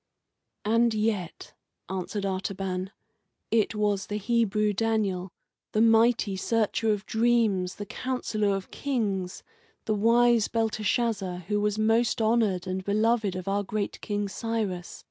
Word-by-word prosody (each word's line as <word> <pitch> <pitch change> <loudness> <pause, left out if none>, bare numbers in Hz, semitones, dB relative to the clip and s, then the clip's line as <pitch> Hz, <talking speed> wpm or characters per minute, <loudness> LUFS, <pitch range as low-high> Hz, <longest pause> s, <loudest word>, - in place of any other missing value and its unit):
"And 230 +1 +3
yet," 210 -5 -2 0.3
answered 190 +2 -3
Artaban, 190 -1 -3 0.6
"it 225 -1 +2
was 205 -2 0
the 205 - -3
Hebrew 215 -1 +1
Daniel, 200 -4 0 0.4
the 215 - +2
mighty 225 -2 +4
searcher 220 +2 +1
of 210 -1 -2
dreams, 220 -6 +1
the 205 - -6
counsellor 215 -3 -1
of 195 -1 -6
kings, 200 -9 -2 0.4
the 215 - +1
wise 230 +1 +4
Belteshazzar, 215 -4 -1
who 205 0 +1
was 210 0 0
most 225 +2 +2
honoured 220 -5 +2
and 185 0 -3
beloved 215 0 +1
of 185 0 -6
our 200 +1 +1
great 205 +1 -3
King 205 -1 -2
Cyrus. 205 -4 -3
210 Hz, 125 wpm, -27 LUFS, 195-225 Hz, 0.6 s, mighty